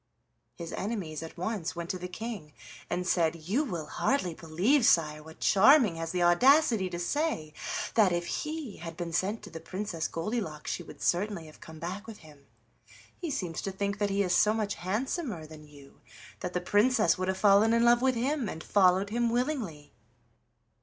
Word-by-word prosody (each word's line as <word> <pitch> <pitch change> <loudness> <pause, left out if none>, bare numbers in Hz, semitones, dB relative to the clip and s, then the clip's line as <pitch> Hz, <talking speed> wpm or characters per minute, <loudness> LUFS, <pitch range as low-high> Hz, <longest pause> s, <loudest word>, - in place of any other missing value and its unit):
His 170 -1 -7
enemies 190 -8 -4
at 165 +1 -9
once 180 -1 -3
went 170 0 -4
to 185 - -5
the 180 - -5
King 190 -6 -7 0.4
and 180 - -2
said: 170 -3 +2
"You 185 - -1
will 175 - -4
hardly 185 - 0
believe, 180 - +1
sire, 155 -6 +3
what 160 +1 -14
Charming 220 - +5
has 165 0 -4
the 180 -1 0
audacity 225 - +4
to 175 - -5
say 175 - -1 0.4
that 210 -5 +4
if 175 0 -1
he 300 - -4
had 165 0 -8
been 170 -2 -4
sent 200 +6 -1
to 205 - -10
the 165 - -7
Princess 185 -1 -4
Goldilocks 165 -4 -3
she - - -3
would - - -11
certainly 185 -1 0
have 155 - -15
come 160 0 -11
back 185 +7 -6
with 225 -2 -9
him. 145 -2 -17 0.7
He 340 - -5
seems 180 - -3
to 195 - -3
think 200 +1 -3
that 205 -1 +1
he 200 0 +1
is 180 -2 +1
so 215 +3 +4
much 210 -2 -1
handsomer 215 - -3
than 155 -1 -13
you 140 -2 -17 0.4
that 180 - -5
the 180 - -1
Princess 205 -1 +3
would 185 - -1
have 190 0 -1
fallen 205 +2 +5
in 230 0 +3
love 240 0 +5
with 260 -1 +2
him 255 -1 -1
and 160 - -7
followed 195 0 +3
him 235 +1 +1
willingly." 235 - -2
190 Hz, 190 wpm, -29 LUFS, 165-225 Hz, 0.7 s, Charming